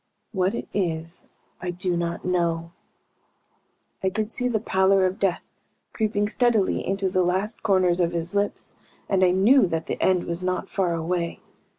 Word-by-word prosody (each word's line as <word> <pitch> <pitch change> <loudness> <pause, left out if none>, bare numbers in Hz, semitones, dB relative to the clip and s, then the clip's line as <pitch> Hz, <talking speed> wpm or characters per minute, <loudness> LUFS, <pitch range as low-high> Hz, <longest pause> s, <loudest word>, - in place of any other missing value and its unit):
What 190 +1 0
it - - -5
is 165 -3 -3 0.4
I 180 - -3
do 180 0 -1
not 170 0 -3
know." 170 -2 0 1.3
I 190 - +1
could 215 +3 -2
see 250 - 0
the 230 -3 0
pallor 190 -2 +3
of 185 +1 -2
death 195 -3 0 0.5
creeping 210 -2 0
steadily 225 -3 +1
into 195 0 -1
the 185 0 +1
last 190 +5 -1
corners 185 -4 +2
of 170 -1 +2
his 170 +2 -3
lips, 205 0 -2 0.3
and 190 -2 +2
I 185 - +6
knew 195 +6 +5
that 165 -1 -2
the - - -4
end 185 -2 +3
was 170 +1 -4
not 185 0 -2
far 180 -4 0
away. 170 +1 -2
185 Hz, 170 wpm, -24 LUFS, 175-200 Hz, 1.3 s, I